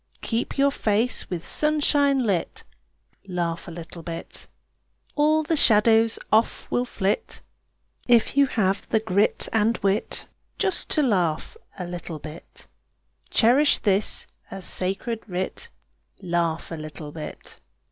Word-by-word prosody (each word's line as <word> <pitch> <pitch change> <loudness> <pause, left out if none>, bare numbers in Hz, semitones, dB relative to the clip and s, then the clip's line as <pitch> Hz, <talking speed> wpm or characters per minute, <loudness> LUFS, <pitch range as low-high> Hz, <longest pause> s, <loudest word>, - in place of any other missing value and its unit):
Keep 230 +1 -2
your 280 0 +4
face 225 -1 0
with 175 -3 -4
sunshine 290 -3 +2
lit, 195 -5 -1 0.6
Laugh 170 -2 -3
a - - -6
little 170 0 -9
bit. 165 0 -8 0.7
All 310 +1 +3
the 320 +2 0
shadows 225 -3 +4
off 220 +2 +2
will 245 - +1
flit, 200 -4 -2 0.6
If 240 0 +4
you 280 -1 +5
have 195 -5 0
the 220 - +3
grit 205 -1 +1
and 225 +1 +2
wit 200 +2 0 0.3
Just 385 -3 -1
to 305 - +2
laugh 180 - 0 0.2
a 180 - -4
little 175 -2 -6
bit. 155 +2 -11 0.6
Cherish 265 +6 +4
this 200 0 +2 0.2
as 195 -1 -2
sacred 195 +5 +1
writ 185 -1 -4 0.5
Laugh 170 -2 -1
a - - -3
little 155 -1 -8
bit. 155 0 -9
210 Hz, 125 wpm, -24 LUFS, 175-245 Hz, 0.7 s, you